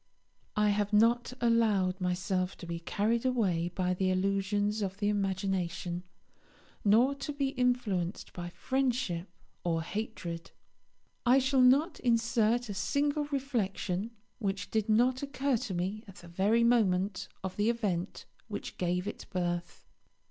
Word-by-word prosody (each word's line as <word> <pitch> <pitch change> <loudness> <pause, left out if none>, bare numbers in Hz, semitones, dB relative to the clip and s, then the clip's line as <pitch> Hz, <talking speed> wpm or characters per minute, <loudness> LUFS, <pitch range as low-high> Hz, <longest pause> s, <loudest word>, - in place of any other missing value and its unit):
I 210 0 +3
have 205 0 +1
not 230 +4 +4
allowed 210 -6 +2
myself 185 +1 -1
to - - -9
be 170 0 -4
carried 215 +7 0
away 195 -10 +1
by 180 -1 +1
the 185 +1 0
illusions 195 +3 +1
of 195 -1 -2
the 205 0 +1
imagination, 190 -3 -1 0.8
nor 230 +7 +5
to 280 +1 -5
be 280 -2 -1
influenced 245 -9 -1
by 175 -1 -5
friendship 245 -7 -1 0.3
or 165 -2 0
hatred. 175 -4 -5 0.7
I 250 +1 +5
shall 265 0 +3
not 280 +7 +4
insert 235 0 +2
a 205 - -4
single 290 +8 0
reflection 230 -8 -2 0.3
which 200 -2 -3
did 220 -1 0
not 245 +4 +3
occur 280 -2 0
to 225 -4 -4
me 190 +5 -2
at 195 - -12
the 175 - -13
very 200 +7 +2
moment 200 -5 +2 0.2
of 190 -1 -4
the 210 +2 +2
event 200 -6 -2 0.2
which - - -6
gave 180 +1 0
it 210 - -6
birth. 175 -2 -3
205 Hz, 140 wpm, -31 LUFS, 185-240 Hz, 0.8 s, nor